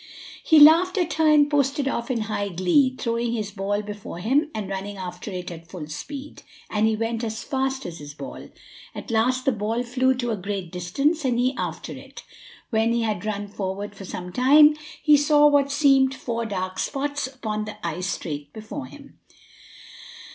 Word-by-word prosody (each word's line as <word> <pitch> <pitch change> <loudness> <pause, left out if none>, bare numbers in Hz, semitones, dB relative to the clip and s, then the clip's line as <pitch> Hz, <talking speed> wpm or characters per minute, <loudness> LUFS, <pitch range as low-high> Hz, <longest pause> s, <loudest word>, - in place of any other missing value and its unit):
He 315 -2 +6
laughed 335 +6 +7
at 350 -3 0
her 320 -1 +2
and 295 -1 +6
posted 285 -1 +1
off 235 -3 -2
in 240 -3 0
high 210 -2 -2
glee, 195 - +2
throwing 235 0 -1
his 215 -3 -3
ball 205 +1 -2
before 205 -4 -7
him 275 - +1
and 215 -3 -3
running 195 +1 -5
after 180 +1 -6
it 180 -2 -5
at 165 -1 -10
full 180 -4 -7
speed; 280 - -8 0.3
and 215 +1 +2
he 220 - +1
went 225 +1 -2
as 220 0 -4
fast 265 0 -2
as 170 -1 -7
his 145 0 -10
ball. - - -8 0.5
At - - -7
last 255 +3 +1
the 270 - +4
ball 225 +2 -2
flew 260 +2 +1
to 240 -2 -2
a - - 0
great 195 -3 -5
distance, 275 - 0
and 250 -3 +1
he 250 +2 +2
after - - -4
it. - - -10 0.5
When 225 +1 +2
he 235 -1 +1
had 210 -4 -2
run 205 -1 -3
forward 200 0 -5
for 195 -1 -10
some 180 0 -7
time, 295 +4 +6 0.3
he 300 -1 +6
saw 295 +1 +4
what 285 -1 +4
seemed 270 -2 +4
four 230 -3 -3
dark 185 -2 -4
spots 285 -1 -2
upon 220 -5 -4
the 215 - -8
ice 175 +3 -2
straight 145 -6 -4
before 225 +6 -7
him. 280 0 -15
230 Hz, 190 wpm, -24 LUFS, 200-275 Hz, 0.5 s, laughed